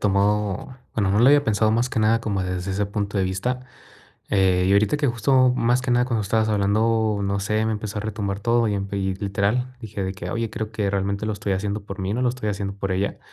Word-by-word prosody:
tomado 105 Hz, +3 st, 0 dB, 0.2 s
Bueno, 100 Hz, -3 st, +1 dB
no 105 Hz, -, +2 dB
lo 120 Hz, -, +6 dB
había 145 Hz, +1 st, +6 dB
pensado 110 Hz, -2 st, +2 dB
más 120 Hz, +3 st, +1 dB
que 115 Hz, -, 0 dB
nada 110 Hz, +1 st, +3 dB
como 100 Hz, -4 st, -1 dB
desde 90 Hz, +1 st, -3 dB
ese 100 Hz, +1 st, 0 dB
punto 100 Hz, 0 st, -2 dB
de 95 Hz, -, +2 dB
vista, 110 Hz, +8 st, -2 dB, 0.7 s
eh, 95 Hz, -2 st, +3 dB
y -, -, +3 dB
ahorita 105 Hz, +6 st, +3 dB
que 145 Hz, -1 st, 0 dB
justo, 125 Hz, +2 st, +3 dB
más 120 Hz, +2 st, +2 dB
que 125 Hz, -, -2 dB
nada 125 Hz, 0 st, +3 dB
cuando 115 Hz, -4 st, 0 dB
estabas 110 Hz, +2 st, +1 dB
hablando, 110 Hz, +1 st, +1 dB
no 100 Hz, 0 st, -1 dB
sé, 105 Hz, +2 st, 0 dB
me 110 Hz, -, 0 dB
empezó 105 Hz, -1 st, -4 dB
a -, -, -2 dB
retumbar 100 Hz, -2 st, -3 dB
todo, 115 Hz, +1 st, +2 dB
y 100 Hz, -, 0 dB
empe 100 Hz, 0 st, -3 dB
y 95 Hz, -1 st, -1 dB
literal, 105 Hz, +6 st, -1 dB
dije 105 Hz, -3 st, -5 dB
de 95 Hz, -, -2 dB
que: 90 Hz, -1 st, -6 dB
"Oye, 115 Hz, 0 st, -2 dB
creo 110 Hz, 0 st, -5 dB
que 105 Hz, -3 st, -1 dB
realmente 100 Hz, +1 st, -1 dB
lo 110 Hz, -, -1 dB
estoy 100 Hz, -1 st, -2 dB
haciendo 100 Hz, +2 st, -2 dB
por 100 Hz, 0 st, -8 dB
mí, 95 Hz, +3 st, -2 dB
no 125 Hz, -, -1 dB
lo 125 Hz, -, +3 dB
estoy 120 Hz, -4 st, -4 dB
haciendo 100 Hz, -1 st, -3 dB
por 100 Hz, -1 st, -3 dB
ella". 100 Hz, +2 st, -1 dB
105 Hz, 250 wpm, -23 LUFS, 100-115 Hz, 0.7 s, lo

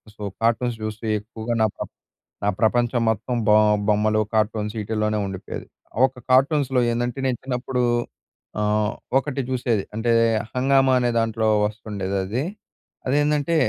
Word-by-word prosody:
So, 105 Hz, -, -14 dB, 0.2 s
cartoons 115 Hz, +1 st, +1 dB
జూస్తూ 110 Hz, +1 st, -5 dB
ఎక్కువగా 110 Hz, +2 st, -5 dB
నా -, -, +4 dB
ప్ర -, -, -4 dB, 0.6 s
నా -, -, +2 dB
ప్రపంచం 120 Hz, +1 st, +2 dB
మొత్తం 110 Hz, +3 st, -2 dB
బో 105 Hz, -, +6 dB, 0.3 s
బొమ్మలు, 110 Hz, +1 st, +3 dB
కార్టూన్స్ 105 Hz, -1 st, 0 dB
ఈటిల్లోనే 105 Hz, 0 st, -1 dB
ఉండిపోయేది. 95 Hz, -1 st, -7 dB, 0.4 s
ఒక 130 Hz, -1 st, -11 dB
కార్టూన్స్‌‌లో 135 Hz, 0 st, +3 dB
ఏందంటే 120 Hz, +2 st, -2 dB
నేను 130 Hz, -2 st, +1 dB
చిన్నప్పుడు 125 Hz, 0 st, -2 dB, 0.8 s
ఆహ్, 105 Hz, 0 st, +1 dB, 0.2 s
ఒకటి 135 Hz, 0 st, -2 dB
చూసేది 120 Hz, -5 st, 0 dB
అంటే 115 Hz, +2 st, 0 dB, 0.4 s
హంగామా 135 Hz, +1 st, +3 dB
అనే 120 Hz, -1 st, +1 dB
దాంట్లో 115 Hz, -1 st, 0 dB, 0.2 s
ఒస్తుండేదది. 100 Hz, +1 st, -3 dB, 0.6 s
అదేందంటే 145 Hz, +3 st, +1 dB
115 Hz, 125 wpm, -23 LUFS, 105-130 Hz, 0.8 s, బో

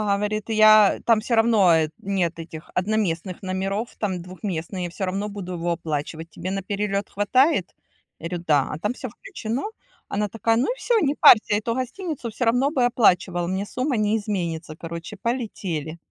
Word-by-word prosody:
говорит: 210 Hz, +2 st, -2 dB
"Я 215 Hz, -2 st, +6 dB
там 230 Hz, -2 st, +4 dB
всё 235 Hz, +2 st, 0 dB
равно 225 Hz, -6 st, +5 dB, 0.2 s
нет 185 Hz, -4 st, -1 dB
этих 160 Hz, -1 st, -9 dB
одноместных 185 Hz, -3 st, -1 dB
номеров, 195 Hz, +4 st, -3 dB
там 190 Hz, -4 st, -2 dB
двухместные, 180 Hz, 0 st, -5 dB
всё 190 Hz, +2 st, -3 dB
равно 195 Hz, +3 st, -2 dB
буду 190 Hz, -3 st, -6 dB
его 175 Hz, 0 st, -2 dB
оплачивать. 160 Hz, 0 st, -4 dB
Тебе 185 Hz, +3 st, -6 dB
на 195 Hz, -, -2 dB
перелет 200 Hz, +1 st, -2 dB
хватает?" 205 Hz, -, +2 dB, 0.5 s
Я 165 Hz, -, -5 dB
говорю: 175 Hz, -1 st, -4 dB
"Да, 145 Hz, -3 st, +3 dB
а 150 Hz, -, -4 dB
там 210 Hz, +6 st, -1 dB
всё 255 Hz, -, -6 dB
включено". 225 Hz, +4 st, -5 dB, 0.5 s
Она 210 Hz, +1 st, -1 dB
такая: 225 Hz, +1 st, +1 dB
"Ну 240 Hz, -, +2 dB
и -, -, -5 dB
всё, 475 Hz, -2 st, +2 dB
не 285 Hz, +1 st, +1 dB
парься, 215 Hz, -2 st, +7 dB
эту 220 Hz, +2 st, -1 dB
гостиницу 260 Hz, +2 st, -4 dB
всё 240 Hz, +3 st, -2 dB
равно 245 Hz, +4 st, +3 dB
бы 255 Hz, -5 st, +2 dB
оплачивала, 180 Hz, -7 st, +2 dB
мне 190 Hz, +3 st, -2 dB
сумма 255 Hz, +3 st, -2 dB
не 215 Hz, +1 st, +2 dB
изменится". 170 Hz, -7 st, -3 dB
Короче, 170 Hz, +5 st, -7 dB
полетели. 190 Hz, -, -3 dB
200 Hz, 170 wpm, -23 LUFS, 175-225 Hz, 0.5 s, парься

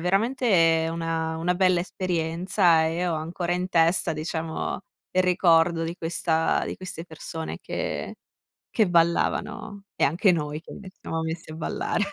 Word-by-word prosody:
veramente 180 Hz, -4 st, +3 dB
una 165 Hz, -1 st, -2 dB
una 175 Hz, +2 st, 0 dB
bella 185 Hz, -2 st, +3 dB
esperienza, 175 Hz, -1 st, +1 dB
e 160 Hz, +1 st, -2 dB
io 180 Hz, 0 st, 0 dB
ho -, -, 0 dB
ancora 170 Hz, +3 st, -3 dB
in 180 Hz, +1 st, -1 dB
testa, 170 Hz, -1 st, +3 dB
diciamo, 160 Hz, +2 st, -3 dB, 0.3 s
il 185 Hz, -, +3 dB
ricordo 170 Hz, -2 st, +4 dB
di 170 Hz, +1 st, -4 dB
questa 165 Hz, -1 st, 0 dB
di -, -, -5 dB
queste 185 Hz, -2 st, -7 dB
persone 160 Hz, 0 st, -6 dB
che -, -, -4 dB, 0.6 s
che 220 Hz, -4 st, +2 dB
ballavano 175 Hz, +4 st, 0 dB
e -, -, +3 dB
anche 170 Hz, +8 st, +3 dB
noi 150 Hz, -2 st, -2 dB
che -, -, -11 dB
ci 190 Hz, -, -9 dB
siamo 165 Hz, 0 st, -3 dB
messi 160 Hz, 0 st, -5 dB
a -, -, -7 dB
ballare. 200 Hz, +5 st, -1 dB
170 Hz, 155 wpm, -25 LUFS, 160-185 Hz, 0.6 s, ricordo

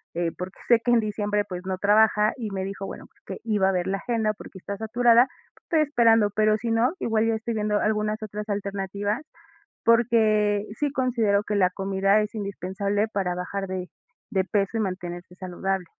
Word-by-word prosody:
eh, 170 Hz, -1 st, 0 dB
porque 180 Hz, +1 st, -7 dB
sé 235 Hz, -1 st, +6 dB
que 245 Hz, -, +2 dB
en 240 Hz, -, +5 dB
diciembre, 210 Hz, -1 st, -1 dB
pues, 180 Hz, -2 st, -5 dB
no 190 Hz, 0 st, -2 dB
trabaja. 210 Hz, +1 st, +4 dB
Y 225 Hz, -4 st, -4 dB
me 190 Hz, -1 st, -3 dB
dijo, 195 Hz, 0 st, -5 dB
bueno, -, -, -8 dB
pues, -, -, -34 dB
que 190 Hz, -, -7 dB
iba 210 Hz, -4 st, +2 dB
a -, -, +2 dB
ver 180 Hz, -2 st, -1 dB
la 195 Hz, +1 st, 0 dB
agenda, 220 Hz, 0 st, -1 dB
porque 205 Hz, -, -12 dB
está 200 Hz, +2 st, -6 dB
saturada, 235 Hz, +3 st, +4 dB, 0.4 s
estoy 320 Hz, -2 st, +2 dB
esperando, 230 Hz, -7 st, +4 dB
pero 215 Hz, +1 st, +3 dB
si 230 Hz, +2 st, -3 dB
no, 230 Hz, +6 st, +2 dB
igual 220 Hz, -1 st, +1 dB
yo 225 Hz, -, +2 dB
estoy 230 Hz, +1 st, -3 dB
viendo 210 Hz, -1 st, 0 dB
algunas 215 Hz, 0 st, 0 dB
otras 210 Hz, 0 st, -6 dB
alternativas, 200 Hz, +2 st, -2 dB, 0.6 s
porque 215 Hz, -3 st, +3 dB
sí 295 Hz, -1 st, 0 dB
considero 235 Hz, -7 st, +1 dB
que 210 Hz, -, -2 dB
la 185 Hz, -2 st, +3 dB
comida 195 Hz, +2 st, +1 dB
es 210 Hz, +1 st, -5 dB
indispensable 200 Hz, 0 st, -2 dB
para 195 Hz, -4 st, -1 dB
bajar 195 Hz, +2 st, -4 dB
de 185 Hz, -1 st, -4 dB, 0.4 s
de 190 Hz, -2 st, +2 dB
peso, 200 Hz, +2 st, -1 dB
y -, -, 0 dB
mantenerse 180 Hz, -3 st, -5 dB
saludable. 185 Hz, 0 st, -3 dB
210 Hz, 190 wpm, -25 LUFS, 195-220 Hz, 0.6 s, sé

